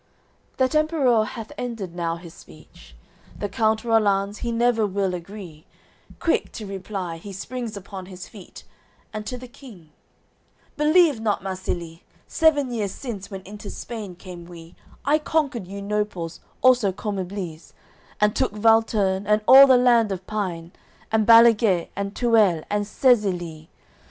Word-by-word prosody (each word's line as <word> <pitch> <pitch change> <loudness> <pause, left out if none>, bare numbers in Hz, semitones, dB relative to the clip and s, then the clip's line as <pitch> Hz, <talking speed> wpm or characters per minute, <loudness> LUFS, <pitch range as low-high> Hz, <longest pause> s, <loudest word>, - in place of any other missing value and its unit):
XIV - - -37
That 260 +1 +1
Emperour 290 -8 +3
hath 220 0 -8
ended 225 -8 -5
now 170 -1 -2
his 170 -1 -11
speech. 75 -5 -17 0.4
The 205 - -3
Count 220 +2 0
Rollanz, 205 -3 +1
he 235 - -3
never 230 -2 +2
will 195 -1 -1
agree, 175 -3 -9 0.5
Quick 330 - 0
to 220 - -7
reply, 190 -3 -5
he 200 +5 -10
springs 230 +3 -6
upon 190 -1 -9
his 185 -1 -9
feet; 205 -5 -13 0.5
And 215 0 -6
to 250 - -4
the 250 +1 -10
King, 215 - -15 0.8
"Believe 305 -3 +4
not 215 -3 -1
Marsilie. 175 -3 -5 0.2
Seven 290 -5 +2
years 210 -4 -2
since, 205 -7 -7
when 195 -2 -7
into 205 +2 -10
Spain 215 -6 -7
came 175 -1 -10
we, 170 -1 -12 0.3
I 295 +3 +3
conquer'd 285 - -1
you 200 +1 -7
Noples 205 -5 -3 0.2
also 250 -6 +5
Commibles, 185 -4 -5 0.5
And 210 0 +2
took 260 -6 0
Valterne, 210 -3 +2
and 210 0 +2
all 270 +2 +10
the 260 -2 +6
land 240 -4 +4
of 185 -1 -5
Pine, 180 -6 -4 0.4
And 220 -1 +2
Balaguet, 230 -6 +5
and 200 +1 -4
Tuele, 215 -9 +3
and 205 0 0
Sezilie. 180 - +1
210 Hz, 145 wpm, -23 LUFS, 185-235 Hz, 0.8 s, all